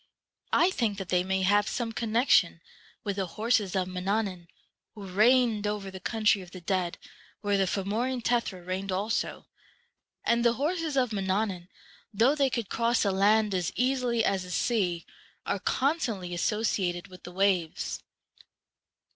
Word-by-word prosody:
I 360 - +4
think 225 - -1
that 195 -3 -6
they 180 -1 +2
may 190 0 0
have 205 +2 +3
some 235 -2 -2
connection 230 +3 +2 0.4
with 200 -3 -3
the 190 -2 -1
horses 215 -3 +1
of 185 -1 0
Mannannan, 185 -1 -2 0.5
who 205 -2 -8
reigned 215 +2 +3
over 205 -2 -3
the 190 - -8
country 215 -1 +1
of 180 - -11
the 185 - -10
dead, 180 -1 -1 0.4
where 205 -1 +1
the 195 -1 +2
Fomorian 225 +7 -1
Tethra 235 -7 0
reigned 190 +2 -3
also; 200 +4 -2 0.8
and 235 0 +2
the 235 -1 +4
horses 310 +2 -1
of 250 -4 +1
Man 195 -2 -2
89 190 +1 +1
nannan, 175 -1 -10 0.5
though 235 +7 +4
they 280 -3 +2
could 235 -4 -2
cross 235 +3 +1
the 200 - +2
land 205 +2 +3
as 180 -2 -1
easily 250 -2 +1
as 195 -1 +1
the 180 - -8
sea, 180 -4 0 0.4
are - - -1
constantly 245 - -1
associated 185 -1 -1
with 185 -1 -14
the 175 - -9
waves. 185 -3 0
205 Hz, 160 wpm, -28 LUFS, 185-235 Hz, 0.8 s, I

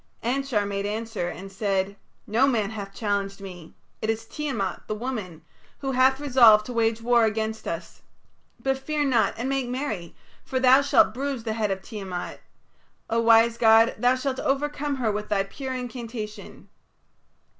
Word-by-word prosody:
Anshar 250 -3 0
made 200 0 -2
answer 220 -3 -3
and 195 +2 -8
said: 195 0 -1 0.3
"No 235 +6 +3
man 220 -6 0
hath 200 -3 -6
challenged 200 -1 -2
me. 180 -4 -10 0.3
It 220 - -2
is 225 0 -1
Tiamat, 225 -9 -4
the 215 - -2
woman, 210 -9 -5 0.3
who 270 -1 -3
hath 260 +1 +3
resolved 240 -7 +6
to 250 - -6
wage 225 -1 +1
war 235 -1 +4
against 220 0 -2
us. - - -6 0.6
But 270 0 -1
fear 300 +1 -1
not 245 -5 +2
and 240 +3 -3
make 270 -2 -1
merry, 245 - -4 0.3
for 260 - -2
thou 260 +1 +6
shalt 280 -5 +4
bruise 270 -1 -3
the 220 -1 -2
head 220 -2 -1
of 190 -1 -3
Tiamat. 195 -5 -6 0.7
O 230 - +2
wise 230 0 +5
god, 225 0 +6
thou 245 +3 +3
shalt 260 0 -2
overcome 290 +1 -1
her 240 -5 0
with 210 +1 -4
thy 195 -2 +2
pure 260 +6 -6
incantation. 235 -3 -7
225 Hz, 165 wpm, -25 LUFS, 210-260 Hz, 0.7 s, resolved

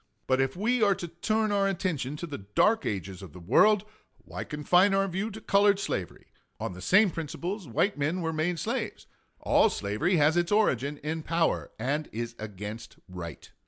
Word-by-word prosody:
But 130 0 +2
if 135 0 -1
we 230 +6 +1
are 200 -2 +4
to 175 - -6
turn 215 +6 -1
our 200 -1 +2
attention 165 -8 -2
to 170 - -5
the 150 -4 -6
dark 205 - +2
ages 95 -1 -4
of 95 -6 -11
the 90 - -10
world, 205 - +4 0.3
why - - -7
confine 180 +7 +3
our 195 0 +2
view 195 +4 -2
to 220 0 -8
colored 200 -1 +3
slavery? 95 - -4 0.3
On - - -4
the 90 - -10
same 190 - +4
principles 170 +4 -5
white 165 - 0
men 160 +6 0
were 160 -1 -2
made 165 +3 0
slaves. - - -3 0.4
All - - +4
slavery 105 - 0
has 155 +1 +3
its 175 +1 +1
origin 145 - +2
in 160 +1 -2
power 165 +1 0
and 145 +6 -2
is 115 +1 -4
against 105 +1 -7
right. 90 -4 -8
160 Hz, 185 wpm, -28 LUFS, 120-195 Hz, 0.4 s, are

